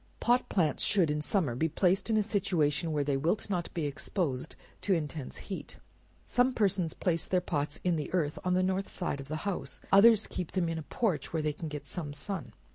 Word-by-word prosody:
Pot 245 +1 +2
plants 160 -7 +1
should 180 -7 +4
in 150 0 -1
summer 155 - +1
be 160 +7 0
placed 185 +6 +2
in 220 - +3
a 215 - +3
situation 175 -6 +1
where 150 -2 +1
they 140 -1 0
wilt 170 +9 0
not 175 -3 -1
be 165 -3 -1
exposed 140 -1 -2 0.3
to 195 - +2
intense 150 -3 -4
heat. 195 - -7 0.5
Some 250 +1 +2
persons 195 -7 +1
place 165 -3 0
their 185 - +2
pots 150 -4 -2
in 175 -2 +2
the 150 - -4
earth 155 -5 0
on 180 0 +1
the 185 - +3
north 190 +1 0
side 145 -6 -3
of 135 - -10
the 155 - -3
house; 200 -3 -2
others 215 +2 +7
keep 180 - -5
them 180 -3 +1
in 165 -1 -2
a - - -4
porch 180 - -1
where 160 -2 -1
they 150 -1 0
can 160 +2 -6
get 150 -2 -6
some 145 0 -5
sun. 195 +7 -4
170 Hz, 215 wpm, -30 LUFS, 150-195 Hz, 0.5 s, others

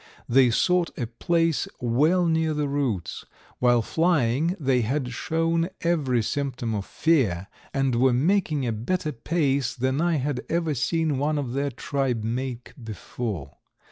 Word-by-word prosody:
They 130 0 +5
sought 180 +7 +2
a 125 - -1
place 165 +7 0
well 150 +9 +2
near 160 -1 +1
the 150 -1 0
roots. 135 - -2 0.4
While 120 -2 +4
flying 160 - +1
they 130 -4 +2
had 125 +2 -1
shown 165 +3 0
every 140 -9 +1
symptom 125 -3 -2
of 100 -2 -3
fear 115 - +1 0.3
and 135 -2 0
were 125 +2 +4
making 155 +1 +1
a 120 - 0
better 150 +9 -2
pace 140 0 0
than 130 +3 0
I 170 -1 +2
had 140 -2 -2
ever 165 -2 0
seen 155 +2 0
one 150 +2 0
of 130 -4 -3
their 140 +1 0
tribe 130 -2 -2
make 125 +2 -4
before. 105 - -5
135 Hz, 145 wpm, -25 LUFS, 120-160 Hz, 0.4 s, They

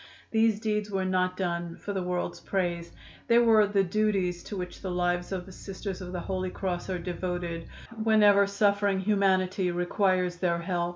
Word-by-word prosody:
These 225 -1 +3
deeds 210 -1 -1
were 190 -2 -1
not 185 0 0
done 170 -2 -2
for 205 - -6
the 190 - -1
world's 180 0 -2
praise; 175 -3 -2 0.4
they 235 - +5
were 225 -3 +5
the 200 -1 +2
duties 190 -2 0
to 205 - -6
which 180 -1 -6
the 190 - -4
lives 175 0 -1
of 185 -2 -3
the 190 - -12
Sisters 195 0 -6
of 180 -1 -7
the 180 -1 -4
Holy 185 0 -2
Cross 180 -1 -3
are 185 - -1
devoted, 175 -1 -4 0.4
whenever 205 -2 +5
suffering 200 -1 +2
humanity 190 -2 +2
requires 180 0 +1
their 175 -1 +1
help. 175 0 -1
185 Hz, 175 wpm, -28 LUFS, 180-200 Hz, 0.4 s, they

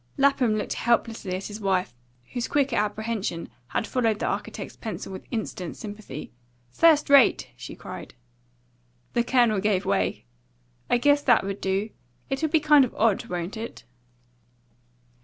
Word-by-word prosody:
Lapham 270 -5 +3
looked 210 - -2
helplessly 225 -5 0
at 190 - -5
his 210 +1 -7
wife, 190 -7 0 0.4
whose 245 -2 -2
quicker 280 -4 +1
apprehension 210 -4 -2 0.2
had 215 - -1
followed 225 -4 +1
the - - -2
architect's - - -4
pencil 220 -3 -6
with 190 - -9
instant 195 -7 -4
sympathy. 205 - -8 0.4
"First 315 - +5
rate!" 280 -3 +5
she - - -9
cried. - - -9 1.0
The 235 - +2
Colonel 240 -4 +3
gave 195 -2 +1
way. - - 0 0.6
"I 245 - +4
guess 285 +3 +4
that 245 -5 +4
would 195 0 -4
do. 195 +3 -1 0.4
It'll 310 +4 0
be 320 +1 +4
kind 300 -2 +6
of 255 - -3
odd, 220 -3 +2
won't 175 +3 -4
it?" 225 +1 -7
220 Hz, 145 wpm, -26 LUFS, 195-255 Hz, 1.0 s, kind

